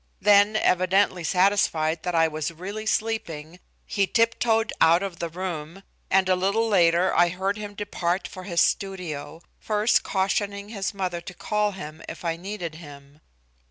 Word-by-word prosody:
Then 205 +1 +5
evidently 185 -2 +2
satisfied 170 -4 +2
that 180 -1 -3
I 165 0 +4
was 155 0 -3
really 200 +6 -7
sleeping 180 -8 -2 0.3
he 200 -2 0
tiptoed 225 +1 +1
out 165 +3 +5
of 185 -4 -5
the 170 - -3
room, 170 0 -6 0.3
and 190 0 +3
a 185 - +4
little 200 +5 +1
later 175 -3 +3
I 175 +1 +5
heard 190 +3 -2
him 210 -1 -7
depart 190 -3 -2
for 185 - -10
his 170 -3 +1
studio, 170 -5 -2 0.2
first 215 +1 +2
cautioning 200 +1 -1
his 200 -2 -4
mother 180 -3 -3
to 175 +1 -10
call 210 +1 -1
him 155 -4 -9
if - - -9
I 165 -1 0
needed 175 -2 -6
him. 145 -2 -13
185 Hz, 160 wpm, -25 LUFS, 170-205 Hz, 0.3 s, Then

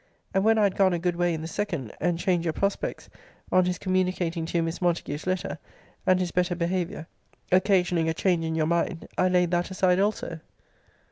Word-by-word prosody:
And 195 - +2
when 225 +1 +4
I 215 - +4
had 200 -2 +2
gone 190 -2 +4
a - - +1
good 175 +1 -1
way 175 0 +1
in 160 -1 -3
the - - -4
SECOND, 170 - -4
and 175 0 +1
change 175 -1 +1
your 165 -2 -1
prospects, 200 0 -2 0.4
on 185 0 +4
his 180 -1 -1
communicating 185 -3 -1
to 170 - -1
you 165 - +2
Miss 165 +2 -4
Montague's 170 -3 -1
letter, 185 -3 -2 0.5
and 185 0 +5
his 180 -2 -1
better 180 -1 +1
behaviour, 170 -2 -2 0.5
occasioning 180 -3 +3
a - - +1
change 175 -2 +1
in 160 0 -2
your 160 -1 +1
mind, 170 +1 -1
I - - +3
laid 180 -1 +2
that 175 +1 0
aside 185 -1 +2
also. 195 -5 -1
175 Hz, 205 wpm, -26 LUFS, 165-185 Hz, 0.5 s, and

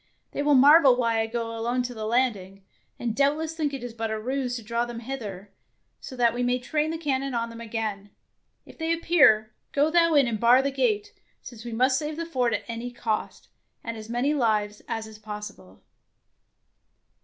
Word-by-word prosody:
They - - -3
will 290 0 +4
marvel 280 0 +7
why 230 -2 +1
I 225 - 0
go 230 0 -4
alone 240 +2 -1
to 245 0 -5
the 215 -2 -5
landing, 205 -6 -1 0.3
and 230 -2 -3
doubtless 300 +3 +1
think 310 -3 -1
it 245 -4 -6
but 225 -1 -3
a 220 0 -2
ruse 255 +2 -2
to 235 - -6
draw 235 +2 -1
them 240 -1 -6
hither, 210 -6 -7 0.5
so 260 - -9
that 240 -2 +3
we 245 - -3
may 245 0 +1
train 300 +5 -1
the 325 - -3
cannon 275 -4 -2
on 230 0 -2
them 230 0 -9
again. 215 -3 -4 0.6
If - - -16
they 325 0 -1
appear, 280 -11 +4 0.2
go 290 +2 +2
thou 335 -1 +4
in 280 -2 +6
and 230 -3 -2
bar 245 +3 +5
the 275 - 0
gate, 415 - 0 0.3
since 230 -3 -10
we 240 - -5
must 255 +4 +2
save 305 0 -4
the 335 - -3
fort 255 -7 0
at - - -4
any 230 +1 -5
cost, 230 -3 -4 0.3
and 230 -1 -5
as 220 0 -9
many 245 +5 0
lives 215 -6 0
as 225 -1 -3
is 220 -1 -12
possible." 210 - -9
240 Hz, 200 wpm, -26 LUFS, 225-280 Hz, 0.6 s, marvel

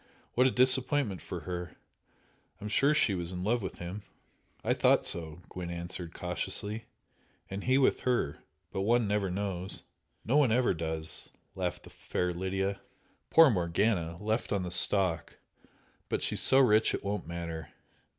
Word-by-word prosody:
What 125 +2 +4
a - - +4
disappointment 130 - +3
for - - -6
her! 90 -1 -6 0.8
I'm 105 - -6
sure 140 +7 +3
she 110 - +3
was 85 -1 -3
in 90 0 -5
love 115 +4 +1
with 95 - -5
him!" 90 +4 -6 0.6
"I - - +2
thought - - +3
so" 80 0 -2
Gwent 90 -2 -6
answered, 85 0 -5
cautiously 100 +5 -3 0.7
"And 100 +1 -5
he 130 +1 +4
with 135 - +3
her! 125 - 0 0.3
But 95 - -2
one 115 +2 +2
never 100 -1 0
knows 95 0 -3 0.2
" - - -44
"No, 130 +6 +2
one 145 -4 +5
never 120 -1 +3
does!" 80 -1 -1 0.2
laughed 90 -2 -3
the - - -13
fair 90 0 -2
Lydia 95 +2 -2 0.5
"Poor 160 -4 +7
Morgana! 85 -2 0
Left 110 +3 -2
on 100 -2 0
the 90 - -5
stalk! 95 -2 +2 0.7
But - - -1
she's - - +1
so 135 - +4
rich 110 -5 +4
it - - -6
won't 100 -3 -3
matter. 85 -2 -5
95 Hz, 160 wpm, -30 LUFS, 90-115 Hz, 0.8 s, Poor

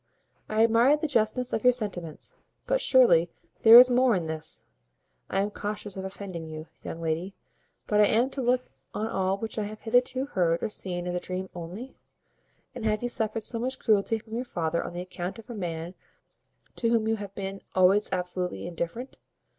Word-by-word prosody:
I 215 +1 +3
admire 230 +6 +5
the 300 - -3
justness 245 -2 0
of 220 - -1
your 250 0 +6
sentiments; 180 -9 -5 0.3
but - - +1
surely 230 -11 +5 0.3
there 225 +1 +10
is 250 +1 +10
more 250 -2 +4
in 175 -3 -1
this. 160 0 -3 0.7
I 195 - +1
am 205 +1 -1
cautious 205 -1 -5
of 190 - -5
offending 190 -4 -7
you, 155 0 -7 0.2
young 165 - -6
lady; 165 +4 -2 0.5
but 210 - +1
am 220 +3 +4
I - - -6
to 275 - -4
look 250 +1 +1 0.3
on 215 - -1
all 190 -3 0
which 220 +1 -4
I 210 - -1
have 215 +1 -8
hitherto 250 +3 +1
heard 170 -9 0
or - - -1
seen 180 -3 -3
as 180 - -2
a 180 - -1
dream 185 +1 -5
only? 180 +10 -7 0.8
And - - -7
have 215 +1 0
you 245 - -1
suffered 220 -1 -2
so 230 +2 -4
much 255 +2 -2
cruelty 215 0 +2
from 220 0 -13
your 240 +2 -1
father 170 -8 -2
on - - -7
the 175 - -4
account 180 +2 -5
of 225 +1 -11
a - - -5
man 170 -4 -4 0.8
to 230 - +1
whom 230 -2 +2
you 225 0 +1
have 200 -1 -8
been 195 0 -5
always 190 +3 +4
absolutely 180 0 -1
indifferent?" 175 +9 -5
210 Hz, 195 wpm, -27 LUFS, 180-230 Hz, 0.8 s, there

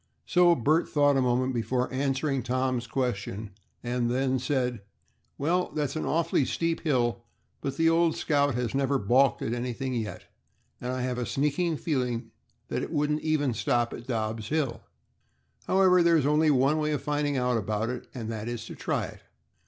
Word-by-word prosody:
So 175 -1 +5
Bert 155 +6 +2
thought 145 -1 +3
a 135 - +3
moment 130 +1 +1
before 125 +2 0
answering 135 +1 0
Tom's 130 0 -1
question, 110 -4 -3 0.3
and 120 0 -1
then 130 +1 +1
said, 125 -4 -1 0.6
"Well, 175 +5 +1
that's 145 -2 -1
an 155 - -2
awfully 165 -3 +2
steep 165 +5 -1
hill, 120 -6 0 0.4
but 135 -1 -3
the 165 - +3
old 165 0 +3
'Scout' 145 -3 +1
has 125 -2 -2
never 135 0 +1
balked 130 +4 +3
at 115 - -1
anything 125 +2 -3
yet, 110 -3 -4 0.6
and 125 - -3
I 130 -1 -2
have 125 -1 -2
a 120 - -1
sneaking 150 +4 0
feeling 125 -7 -2 0.4
that - - -1
it - - -5
wouldn't 150 -1 0
even 150 -5 +1
stop 120 +2 0
at 120 - -9
Dobb's 110 -3 -2
hill. 140 -3 -1 0.9
However, 185 -1 +5
there 170 -1 +5
is 145 - +1
only 150 +2 +3
one 140 +2 +3
way 150 0 0
of 145 - -3
finding 145 -1 0
out 125 -2 +1
about 110 +2 -2
it, 125 - -7
and 115 -3 -5
that 110 0 -5
is 120 -2 -4
to - - -8
try - - -1
it. - - -11
130 Hz, 180 wpm, -28 LUFS, 120-150 Hz, 0.9 s, So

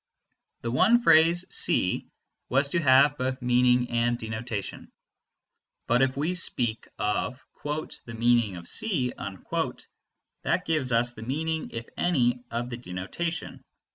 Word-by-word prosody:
The 115 - -3
one 225 - +4
phrase 170 0 +5
C - - +2 0.4
was 140 +2 +2
to 170 +3 0
have 140 0 +5
both 130 0 -1
meaning 125 0 +3
and 120 0 +1
denotation. 110 -2 -5 1.0
But 120 +2 +2
if 130 0 +1
we 155 +5 0
speak 120 -10 -1
of 105 +5 -2 0.2
"the 150 -6 -5
meaning 115 -4 +2
of 85 -1 -9
C," 175 - 0
that 95 -2 -5
gives 155 -6 0
us 120 +1 +2
the 110 - -11
meaning 155 +6 -2
(if 115 0 -6
any) 125 -8 +1
of 120 +2 -4
the 120 - -4
denotation. 125 - -5
125 Hz, 130 wpm, -27 LUFS, 115-150 Hz, 1.0 s, phrase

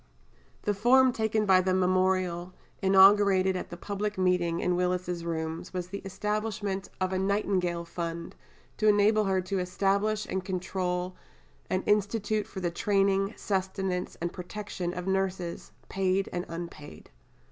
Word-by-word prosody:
The 205 - +1
form 250 +5 +5
taken 220 -1 0
by 190 -2 +5
the 185 0 +1
memorial, 185 -1 +1 0.3
inaugurated 195 -1 +5
at 180 - -4
the 175 - -8
public 205 +2 -3
meeting 180 -2 +1
in 180 - +1
Willis's 180 -1 -1
Rooms, 160 +1 -4
was 180 -1 -3
the 200 +1 -5
establishment 205 0 -3
of 185 0 0
a 185 - 0
"Nightingale 190 -3 0
Fund," 170 0 -5 0.4
to 215 - +2
enable 210 +1 +4
her 190 -1 +1
to 185 +1 -2
establish 200 +4 0
and 190 -1 -3
control 185 -1 -2 0.5
an 185 - 0
institute 210 0 +1
for 190 - -7
the 175 -1 -1
training, 195 +2 +1
sustenance, 190 -2 -2
and 170 0 -3
protection 180 -1 -5
of 180 0 -5
nurses, 190 -2 -2 0.2
paid 190 0 0
and 175 0 -2
unpaid. 165 - -8
190 Hz, 140 wpm, -28 LUFS, 180-200 Hz, 0.5 s, form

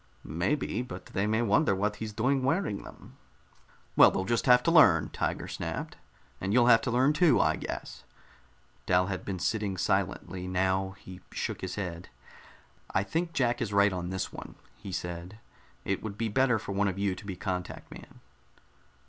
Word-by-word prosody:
"Maybe. 95 - -1
But 95 -7 -8
they 100 +2 -2
may 110 +2 +1
wonder 110 +1 +3
what 105 +2 -1
he's 110 -1 -5
doing 130 +6 +1
wearing 135 - 0
them." - - -14 0.8
"Well, - - +8
they'll 95 - -2
just 115 +5 0
have 125 0 +6
to 165 - +2
learn," 165 -2 +6
Tiger - - -2
snapped. - - -5 0.5
"And 95 - -2
you'll 120 0 +5
have 115 - +4
to - - -2
learn, 130 +5 +3
too, 165 0 +4
I - - +3
guess." - - -7 0.8
Dal 90 0 +4
had 95 - -6
been 95 -2 -4
sitting 100 0 -1
silently. 90 0 -1
Now 95 +1 0
he 90 -1 -12
shook - - -4
his 95 -1 -4
head. 90 -4 -5 0.8
"I 95 - +1
think 165 - -2
Jack 120 -4 +1
is - - -2
right 100 -1 +4
on 90 -1 -4
this 95 0 -3
one," - - -9 0.2
he 100 - -9
said. 90 +2 -5 0.5
"It 100 - -1
would 105 -2 -6
be 115 0 -1
better 125 +2 +3
for 105 - -6
one 100 +1 +1
of 95 -1 -2
you 100 -1 0
to 90 - -10
be 95 - -4
contact 90 -2 -5
man." - - -13
100 Hz, 180 wpm, -29 LUFS, 95-120 Hz, 0.8 s, Well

